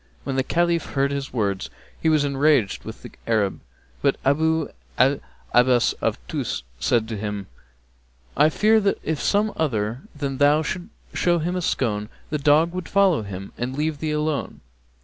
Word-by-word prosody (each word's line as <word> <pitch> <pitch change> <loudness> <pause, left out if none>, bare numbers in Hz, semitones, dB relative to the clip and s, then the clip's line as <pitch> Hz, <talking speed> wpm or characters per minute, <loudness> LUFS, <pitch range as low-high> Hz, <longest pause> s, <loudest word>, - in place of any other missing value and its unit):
When 135 - -3
the 135 - +3
Caliph 170 +2 0
heard 140 0 +1
his 140 -1 -3
words, 100 -5 -1 0.3
he 160 - +3
was 155 -2 +3
enraged 140 -6 +2
with - - -8
the - - -9 0.2
Arab, 105 -4 +1 0.4
but - - +3
Abu 160 +4 +2 0.3
'l 135 +3 +4 0.3
Abbás 125 0 +4
of - - 0
Tús - - -3 0.2
said 115 - +2
to 110 -2 -4
him, 105 -1 -4 0.9
'I 150 +2 +5
fear 220 +6 +4
that 200 -1 +1
if 160 -2 -2
some 210 +1 +2
other 115 -5 -1
than 140 -2 -3
thou 145 +2 +5
should 180 +4 -4 0.2
show 175 -1 +2
him 170 +3 -1
a 180 - -1
scone, 105 -9 -1 0.2
the 150 - 0
dog 150 +4 +4
would 185 -2 -5
follow 195 - +4
him 100 -2 -7
and 125 +3 -3
leave 150 -1 -1
thee 155 - -2
alone.' 150 -1 -2
145 Hz, 170 wpm, -23 LUFS, 120-160 Hz, 0.9 s, I